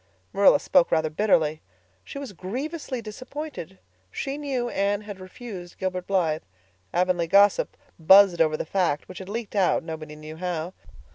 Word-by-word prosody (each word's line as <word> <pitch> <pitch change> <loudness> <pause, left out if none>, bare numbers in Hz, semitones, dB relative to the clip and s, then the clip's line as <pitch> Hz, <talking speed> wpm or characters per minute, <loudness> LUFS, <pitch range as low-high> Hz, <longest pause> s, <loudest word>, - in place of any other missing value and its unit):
Marilla 200 +7 +6
spoke 275 -3 +3
rather 160 -1 +1
bitterly. 155 -4 +2 0.4
She - - -9
was 280 -7 -6
grievously 255 - -5
disappointed. 255 - -7 0.3
She 270 - -4
knew 275 -4 -2
Anne 200 -2 0
had 205 -2 -9
refused 185 -2 -9
Gilbert 185 -1 -3
Blythe. 165 -5 +1 0.5
Avonlea 180 -1 +1
gossip 200 +3 +4 0.2
buzzed 190 +1 +7
over 155 -1 +3
the - - -3
fact, 170 -4 0
which 185 - -9
had 190 0 -9
leaked 220 0 -5
out, 190 -3 +2
nobody 155 -2 -7
knew 155 +1 -10
how. 175 0 -3
190 Hz, 150 wpm, -25 LUFS, 165-225 Hz, 0.5 s, buzzed